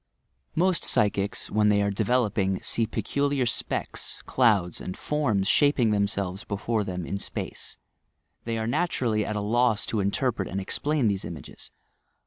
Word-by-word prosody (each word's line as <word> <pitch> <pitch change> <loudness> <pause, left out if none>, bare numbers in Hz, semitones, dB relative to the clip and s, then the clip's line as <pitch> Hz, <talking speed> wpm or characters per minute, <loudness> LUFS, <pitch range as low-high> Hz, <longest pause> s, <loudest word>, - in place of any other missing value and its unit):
Most 180 +1 +2
psychics, 105 +2 +1
when 105 0 +3
they 105 -1 +4
are 100 - +1
developing, 100 -3 +1
see 115 -1 +1
peculiar 140 +5 0
specks, 115 - -2
clouds 105 -9 +2
and 90 - -6
forms 115 -11 0
shaping 140 -4 +3
themselves 100 -2 -1
before 105 +2 -1
them 90 -3 -4
in 100 - -3
space. - - -6 0.7
They 115 0 -2
are 110 - -2
naturally 120 -5 0
at 105 - -3
a 105 - -1
loss 115 +1 +2
to 110 - -1
interpret 100 +1 0
and 95 - -3
explain 140 +7 0
these 100 -2 0
images. 80 -5 -9
105 Hz, 145 wpm, -26 LUFS, 100-125 Hz, 0.7 s, they